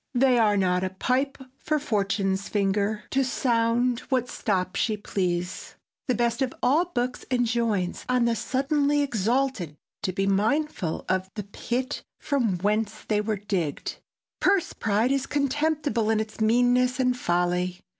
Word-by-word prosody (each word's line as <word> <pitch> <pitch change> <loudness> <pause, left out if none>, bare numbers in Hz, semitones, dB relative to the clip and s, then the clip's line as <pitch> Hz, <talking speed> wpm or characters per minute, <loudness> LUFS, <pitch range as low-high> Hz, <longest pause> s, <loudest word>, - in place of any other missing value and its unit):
They 250 -1 +4
are 210 -2 +4
not 180 -1 +2
a 190 - 0
pipe 255 +8 0 0.2
for 305 - 0
fortune's 195 -6 -1
finger 205 +1 0
To 270 0 +2
sound 240 -1 +1
what 250 -2 +1
stop 185 -4 -1
she 215 -2 0
please." 180 -3 -3 0.3
The 250 - +2
best 235 +1 0
of 260 -1 0
all 295 +8 +4
books 250 -8 -3
enjoins 230 -7 0
on 250 -1 +3
the 235 -1 +2
suddenly 285 +4 +1
exalted 235 - 0 0.2
to 195 - -1
be 195 +1 -1
mindful 215 - 0
of 185 0 0
the 210 - -4
pit 240 +6 -3 0.2
from 240 -10 0
whence 210 +3 -1
they 210 -1 +2
were 210 0 -1
digged. 190 -7 -3 0.4
Purse 390 -2 +2
pride 220 +4 +1
is 275 -1 0
contemptible 290 -4 0
in 220 -1 +3
its 220 0 -5
meanness 245 +3 +3
and 250 -1 +2
folly. 180 -3 0
230 Hz, 145 wpm, -26 LUFS, 195-255 Hz, 0.4 s, They